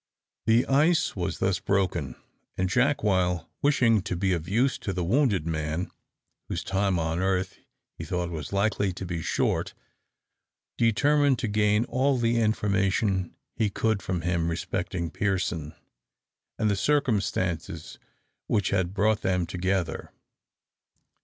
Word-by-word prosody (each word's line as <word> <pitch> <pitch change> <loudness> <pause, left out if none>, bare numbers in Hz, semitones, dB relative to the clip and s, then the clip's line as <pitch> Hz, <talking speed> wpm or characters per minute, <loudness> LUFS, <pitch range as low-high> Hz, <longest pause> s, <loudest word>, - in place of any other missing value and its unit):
The 115 +2 +4
ice 155 +5 +3
was 90 -3 -2
thus 95 0 0
broken, 95 -9 -1 0.4
and 95 - +1
Jack, 140 +7 +2
while 90 -4 +1
wishing 120 -7 +3
to 95 -1 -3
be 95 +1 +1
of 85 0 -3
use 125 +6 +1
to 95 - -3
the 90 -1 -2
wounded 105 - +2
man, 80 +1 -2 0.6
whose - - -3
time 95 -1 0
on 80 0 -1
earth 95 0 -1 0.3
he - - -8
thought 90 -1 -2
was 80 -3 -5
likely 100 -1 +1
to 95 - -6
be 85 -2 -3
short, - - -1 1.0
determined 140 +4 +3
to 120 - -2
gain 105 +1 +2
all 130 +2 +1
the 120 0 +1
information 100 -3 +1 0.2
he 110 - +1
could 110 0 0
from 90 -1 -2
him 85 -1 0
respecting 85 0 -3
Pearson, 90 -6 -2 0.8
and 110 - +1
the 100 - +2
circumstances 95 - -1 0.5
which 100 -3 +1
had 95 -1 0
brought 105 +2 +2
them 90 -2 +1
together. 90 -1 -2
95 Hz, 135 wpm, -27 LUFS, 90-110 Hz, 1.0 s, The